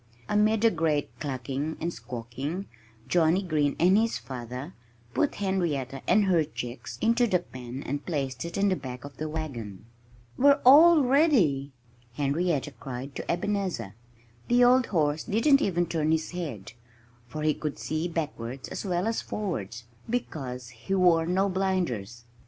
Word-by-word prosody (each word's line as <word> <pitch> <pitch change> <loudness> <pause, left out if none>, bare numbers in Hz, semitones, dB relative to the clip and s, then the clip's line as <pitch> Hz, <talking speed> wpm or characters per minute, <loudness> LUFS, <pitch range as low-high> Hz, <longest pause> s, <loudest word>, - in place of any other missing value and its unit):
Amid 215 +1 +2
a 225 - +6
great 160 -4 0
clucking 140 +2 -3
and 170 +1 -2
squawking, 130 - -5 0.4
Johnnie 175 +2 +3
Green 150 -5 +1
and 180 +3 +5
his 225 +2 +2
father 125 +1 -7 0.4
put 290 - +1
Henrietta 160 -10 -1
and 210 -1 +4
her 175 -4 +3
chicks 125 -5 -7
into 235 +2 +3
the 185 - +3
pen 130 -5 -8
and 145 +1 -3
placed 140 -5 -3
it 170 0 -5
in 200 0 +3
the 185 - +2
back 125 -4 -7
of 140 -2 -11
the 155 0 -3
wagon. 120 -11 -6 0.5
"We're 280 +2 +5
all 310 +4 +8
ready!" 245 - +3 0.4
Henrietta 145 +2 0
cried 135 +1 -6
to - - -3
Ebenezer. 180 - -2 0.5
The 245 +1 +4
old 250 0 +5
horse 155 -4 0
didn't 275 +7 +4
even 175 -3 +1
turn 160 -2 0
his 160 0 0
head, 140 - -6 0.5
for 155 +5 -5
he 155 0 +3
could 150 0 -4
see 155 +2 -2
backwards 140 -7 -4
as - - -5
well 180 -2 -1
as 225 0 0
forwards, 115 - -4 0.3
because 130 - -4
he 125 +11 -4
wore 170 -3 +4
no 190 +3 +2
blinders. 175 - -2
160 Hz, 150 wpm, -27 LUFS, 135-195 Hz, 0.5 s, all